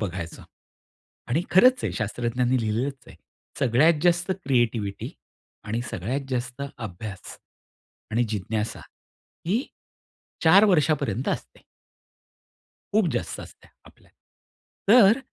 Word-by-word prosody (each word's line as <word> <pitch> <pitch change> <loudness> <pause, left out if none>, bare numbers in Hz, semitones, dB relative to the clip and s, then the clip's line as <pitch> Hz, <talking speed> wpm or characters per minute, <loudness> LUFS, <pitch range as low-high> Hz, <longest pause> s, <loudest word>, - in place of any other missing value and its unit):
बघायचं. 90 -4 -5 0.9
आणि 145 +8 +1
खरंच 250 +7 +6
आहे - - -1
शास्त्रज्ञांनी 120 +3 0
लिहिलेलंच 120 +5 -2
आहे. - - -14 0.4
सगळ्यात 145 +5 +3
जास्त 175 +1 +2
क्रिएटिव्हिटी 115 -6 0 0.5
आणि 110 +2 -2
सगळ्यात 120 +10 -2
जास्त 130 +2 -3
अभ्यास 105 -3 -8 0.7
आणि 120 +2 +2
जिज्ञासा 105 +1 -3 0.7
ही 220 +10 +1 0.8
4 190 +6 +7
वर्षापर्यंत 150 - +1
असते. - - -5 1.3
खूप 215 -3 +4
जास्त - - -3
असत्या - - -14
आपल्या. - - -20 0.8
तर 225 0 +7
125 Hz, 100 wpm, -25 LUFS, 110-165 Hz, 1.3 s, 4